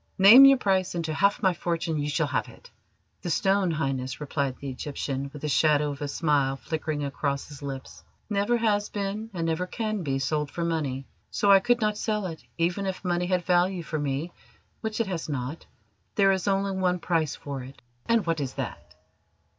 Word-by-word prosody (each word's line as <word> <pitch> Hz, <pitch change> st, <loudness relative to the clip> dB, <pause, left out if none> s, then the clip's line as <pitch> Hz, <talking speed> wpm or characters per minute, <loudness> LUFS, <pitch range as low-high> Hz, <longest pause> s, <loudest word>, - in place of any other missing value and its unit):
Name 220 Hz, +8 st, +10 dB
your 275 Hz, 0 st, +8 dB
price, 190 Hz, -6 st, +1 dB
and, 170 Hz, -1 st, -2 dB
to 155 Hz, -, -2 dB
half 200 Hz, +5 st, +2 dB
my 190 Hz, -2 st, +4 dB
fortune, 165 Hz, -2 st, -2 dB
you 145 Hz, 0 st, -1 dB
shall 150 Hz, +2 st, +1 dB
have 140 Hz, -3 st, -2 dB
it." -, -, -16 dB, 0.5 s
"The 175 Hz, -, -4 dB
stone, 190 Hz, +2 st, +2 dB
Highness," 135 Hz, -5 st, -2 dB
replied 140 Hz, -2 st, -2 dB
the 140 Hz, -, -7 dB
Egyptian, 135 Hz, 0 st, -4 dB
with 150 Hz, 0 st, -10 dB
the -, -, 0 dB
shadow 150 Hz, 0 st, +3 dB
of 140 Hz, +1 st, -8 dB
a 145 Hz, -, -2 dB
smile 140 Hz, -3 st, +1 dB
flickering 155 Hz, -1 st, -3 dB
across 140 Hz, 0 st, -2 dB
his 145 Hz, -2 st, -11 dB
lips, 135 Hz, -2 st, -7 dB, 0.2 s
"never 210 Hz, +3 st, +1 dB
has 210 Hz, -3 st, +1 dB
been, 205 Hz, +2 st, -3 dB
and 170 Hz, -4 st, -3 dB
never 165 Hz, +3 st, -1 dB
can 215 Hz, -1 st, -2 dB
be, 135 Hz, -5 st, -1 dB
sold 150 Hz, +2 st, -1 dB
for 170 Hz, +3 st, -3 dB
money, 145 Hz, -5 st, -2 dB, 0.2 s
so 205 Hz, -, +2 dB
I 195 Hz, -, +8 dB
could 245 Hz, +4 st, +2 dB
not 210 Hz, -1 st, 0 dB
sell 210 Hz, -2 st, -1 dB
it, 165 Hz, -3 st, -6 dB
even 175 Hz, +4 st, 0 dB
if 190 Hz, 0 st, -4 dB
money 175 Hz, 0 st, 0 dB
had 180 Hz, -2 st, 0 dB
value 180 Hz, 0 st, +2 dB
for 155 Hz, 0 st, -3 dB
me, 145 Hz, +4 st, -2 dB, 0.5 s
which 220 Hz, 0 st, -4 dB
it 230 Hz, -, +2 dB
has 175 Hz, -5 st, -4 dB
not. 140 Hz, +2 st, -4 dB, 0.5 s
There 195 Hz, -1 st, +5 dB
is 190 Hz, 0 st, -1 dB
only 195 Hz, 0 st, +1 dB
one 185 Hz, -1 st, +1 dB
price 165 Hz, -4 st, 0 dB
for 140 Hz, -2 st, -6 dB
it." 130 Hz, +2 st, -11 dB, 0.3 s
"And 230 Hz, -4 st, +3 dB
what 165 Hz, -2 st, 0 dB
is 135 Hz, -3 st, -4 dB
that?" -, -, -6 dB
165 Hz, 200 wpm, -27 LUFS, 145-195 Hz, 0.5 s, Name